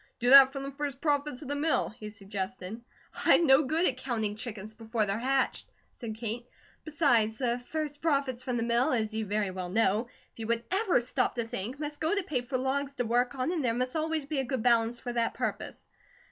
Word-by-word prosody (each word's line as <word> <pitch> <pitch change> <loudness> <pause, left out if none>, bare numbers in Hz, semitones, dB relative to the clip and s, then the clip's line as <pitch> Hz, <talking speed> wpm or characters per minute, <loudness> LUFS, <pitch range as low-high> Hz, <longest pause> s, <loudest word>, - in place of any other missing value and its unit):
"Do 245 +1 +1
that 270 -1 +10
from 275 0 -5
the 275 - -5
first 280 -2 -4
profits 290 -2 -1
of - - -9
the 285 - -2
mill," 305 +2 +1
he 215 0 -9
suggested. 200 0 -6 0.4
"I'm 340 - +5
no 270 +1 +5
good 320 +6 +1
at 255 - +1
'counting 225 -5 -2
chickens 215 -2 -7
before 225 0 -1
they're 200 +2 -2
hatched,'" 265 +2 0 0.2
said 225 -3 -7
Kate. 235 +2 -5 0.4
"Besides, 240 -9 +2
the 245 -2 0
first 305 -2 -3
profits 275 -6 0
from 250 -2 -2
the 230 - 0
mill, 235 +3 +2
as 220 -3 0
you 220 -1 -2
very 205 -1 -1
well 185 -1 -5
know, 220 +3 +2 0.3
if - - -19
you 220 - -4
would 235 0 0
ever 385 - +2
stop 250 +1 -1
to 235 - -1
think, 230 +5 -5
must 295 0 -4
go 320 +5 +1
to 400 - 0
pay 290 -9 -1
for 255 +2 -3
logs 275 +2 -2
to 245 - -1
work 245 +3 +1
on, 260 +5 -1
and 335 -5 -1
there 230 -2 +1
must 255 +3 -2
always 315 -1 -1
be 290 -1 -2
a - - +1
good 255 -2 -3
balance 235 -1 +3
for 245 - -5
that 235 -1 0
purpose. - - -4
250 Hz, 225 wpm, -29 LUFS, 225-280 Hz, 0.4 s, that